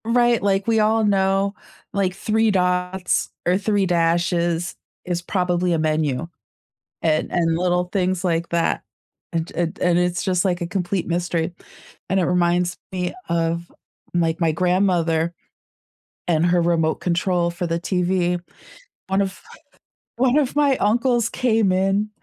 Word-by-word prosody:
Right, 240 0 +3
like, 195 -1 +1
we 225 -1 +2
all 220 +1 +3
know, 195 0 +2 0.4
like, 190 -2 0
3 220 +2 +1
dots 180 -1 0 0.2
or 180 +1 +3
3 205 0 +1
dashes 170 0 +1 0.3
is 175 -1 -2
probably 180 -1 0
a 165 - +1
menu, 155 -2 0 0.8
and 155 -1 +1
and 165 -2 +1
little 180 0 +1
things 185 0 -1
like 170 -1 0
that, 170 -1 0 0.5
and 165 0 -2
and 170 -1 -2
and 175 -1 +2
it's 180 0 0
just, 180 -1 +1
like, 180 -2 0
a 170 - -2
complete 180 0 -2
mystery, 170 -1 -1 0.6
and 190 - +2
it - - +2
reminds 175 0 +1 0.2
me 180 -1 -2
of, 170 0 -1 0.4
my 165 -2 +1
my 165 -2 +3
grandmother 175 -2 +1 1.0
and 165 -1 +2
her 175 0 +3
remote 165 -2 +2
control 175 0 +1
for 175 0 -3
the 165 0 -1
TV. 180 0 0 0.7
One 190 +1 +1
of 195 0 -4 0.8
one 255 +2 +3
of 285 -3 +1
my 285 -2 +3
uncles 235 +2 +2
came 225 -5 +2
in 195 +3 +1
180 Hz, 145 wpm, -22 LUFS, 170-195 Hz, 1.0 s, Right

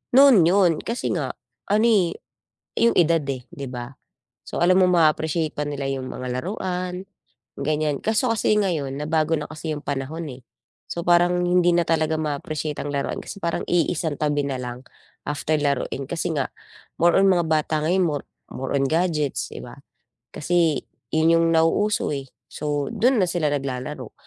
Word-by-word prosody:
noon 265 -10 +8
yun, 185 -1 +4
kasi 235 +1 -2
nga, 140 -6 -2 0.4
ano 215 +2 +4
eh, 190 -7 +3 0.6
yung 235 - +4
edad 165 -2 +4
eh, 130 -3 -3
'di 140 -1 -6
ba? 125 0 -6 0.5
So - - -5
alam 180 +1 +4
mong 185 -1 +4
ma-appreciate 160 -1 +2
pa 150 - -1
nila 140 -2 -3
yung 135 -1 -3
mga 125 0 -4
laruan, 185 +1 -4 0.5
ganyan. 150 0 0
Kaso 225 +3 +1
kasi 215 -1 +2
ngayon 155 -10 0
nabago 155 +2 +1
na 150 - -3
kasi 155 0 -4
yung 145 - -9
panahon 145 +4 -3
eh. 125 - -11 0.5
So 170 - -4
parang 175 +1 +3
hindi 175 -1 +3
na 170 - +3
talaga 160 -1 +1
ma-appreciate 150 0 -3
ang 145 - -4
laruan 140 -1 -2
kasi - - -8
parang 170 0 -2
iisang 165 -3 0
tabi 145 -1 0
na 135 - -2
lang 125 0 -6 0.5
after 150 +1 0
laruin, 140 -1 -1
kasi 170 +2 -2
nga, 140 -4 -1 0.5
more 175 +2 +5
on 195 - +5
mga 175 -2 +3
bata 155 0 +1
ngayon 180 +4 +2
more 145 -3 -2 0.2
more 135 - -5
on 135 -1 +2
gadgets 160 -4 0
di - - -7
ba? - - -9 0.6
Kasi, 165 -1 +1 0.3
yun 160 +1 +3
yung 165 0 +4
nauuso 165 +2 +2
eh, 135 -1 -6 0.2
so 145 -2 -3
dun 250 +1 +3
na 190 - +4
sila 165 -4 0
naglalaro. 135 -2 -4
155 Hz, 170 wpm, -23 LUFS, 145-175 Hz, 0.6 s, noon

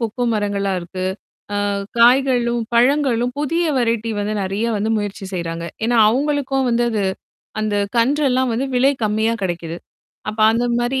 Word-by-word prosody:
கொக்கோ 230 +2 -3
மரங்களா 200 -2 -1
இருக்கு. 180 +1 -6 0.5
அ - - 0 0.4
காய்களும், 240 -1 +4
பழங்களும் 250 -1 +2
புதிய 330 +4 0
வெரைட்டி 230 -2 0
வந்து 205 +1 -2
நிறைய 195 +4 -2
வந்து 210 +2 -1
முயற்சி 205 -2 -4
செய்றாங்க. 170 -2 -4 0.2
ஏன்னா 240 +1 +1
அவுங்களுக்கும் 270 +1 0
வந்து 240 0 +2
அது 215 -3 -1 0.6
அந்தக் 205 -2 -1
கன்று 275 +6 +2
எல்லாம் 255 0 +1
வந்து 250 +4 -1
விலை 265 +3 +4
கம்மியா 220 +2 +1
கிடைக்குது. 170 -2 -3 0.5
அப்ப 215 - -11
அந்த 235 +2 0 0.2
மாதிரி 250 +2 0
230 Hz, 145 wpm, -19 LUFS, 205-255 Hz, 0.6 s, காய்களும்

